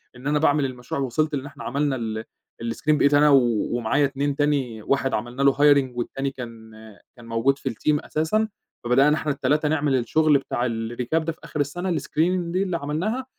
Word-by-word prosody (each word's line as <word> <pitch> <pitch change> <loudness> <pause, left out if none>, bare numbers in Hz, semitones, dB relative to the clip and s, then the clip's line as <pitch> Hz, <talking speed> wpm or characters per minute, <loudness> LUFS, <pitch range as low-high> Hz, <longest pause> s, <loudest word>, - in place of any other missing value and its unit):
إن 130 +3 -8
أنا 150 0 +2
باعمل 145 -2 +3
المشروع 125 +1 -4
و - - +1
وصلت 155 +5 0
لإن 135 -1 -4
إحنا 145 0 -10
عملنا 140 +1 0
ال 110 -2 -4 0.4
الscreen 115 +6 -1
بقيت 145 0 +3
أنا 150 +1 +6
و 140 - +7 0.4
ومعايا 120 +5 +2
2 140 +1 -1
تاني، 140 -7 0
واحد 135 +1 0
عملنا 120 +5 -3
له 140 -1 +5
hiring 140 -2 +4
والتاني 135 +3 -3
كان 115 -3 -9 0.4
كان 120 - -14
موجود 115 +4 +1
في 135 - -3
الteam 145 +5 -1
أساسًا، 185 +9 0 0.4
فبدأنا 135 +5 +4
إحنا 150 -1 -1
ال3 150 +3 +1
نعمل 150 -3 +1
الشغل 145 +4 +3
بتاع 125 -2 -2
الrecap 120 +6 -2
ده 165 - -2
في 160 - -14
آخر 150 - -6
السنة 175 +5 -1
الscreening 175 +2 0
دي 185 +2 +1
اللي 180 -3 -2
عملناها، 180 - -2
140 Hz, 195 wpm, -24 LUFS, 125-150 Hz, 0.4 s, و